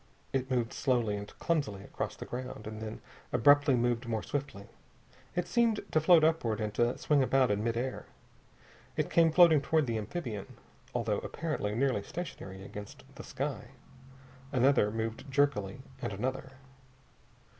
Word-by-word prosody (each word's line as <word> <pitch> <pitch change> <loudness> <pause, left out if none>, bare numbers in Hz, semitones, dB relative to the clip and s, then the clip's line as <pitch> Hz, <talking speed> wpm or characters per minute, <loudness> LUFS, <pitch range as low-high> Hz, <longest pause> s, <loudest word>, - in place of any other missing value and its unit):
It 130 -1 -1
moved 125 -2 0
slowly 120 -6 +1
and 100 0 -5
clumsily 140 -13 -1
across - - -4
the - - -8
ground, 125 -3 -6
and 110 0 -6
then 110 0 -6 0.3
abruptly 145 +1 +5
moved 120 0 0
more 110 -2 -1
swiftly. 135 -8 -4 0.7
It 180 0 0
seemed 230 +1 +2
to 155 - +3
float 165 0 +6
upward 155 -9 +2
and 105 -1 -2
to 120 +3 +1
swing 150 -2 +2
about 130 -2 +3
in 105 +1 0
mid 115 0 0
air. 130 +2 -3 0.9
It - - 0
came 165 -1 +5
floating 160 -3 +7
toward 155 +1 +2
the 115 -3 -1
amphibian, 110 - -5 0.3
though - - 0
apparently 155 -11 -3
nearly 130 -4 +1
stationary 95 - -7
against 105 0 -9
the - - -9
sky. - - -4 0.9
Another 130 -4 +4
moved 115 +5 -4
jerkily, 130 -6 +1 0.2
and - - -2
another.... 130 +6 -3
125 Hz, 150 wpm, -31 LUFS, 110-145 Hz, 0.9 s, floating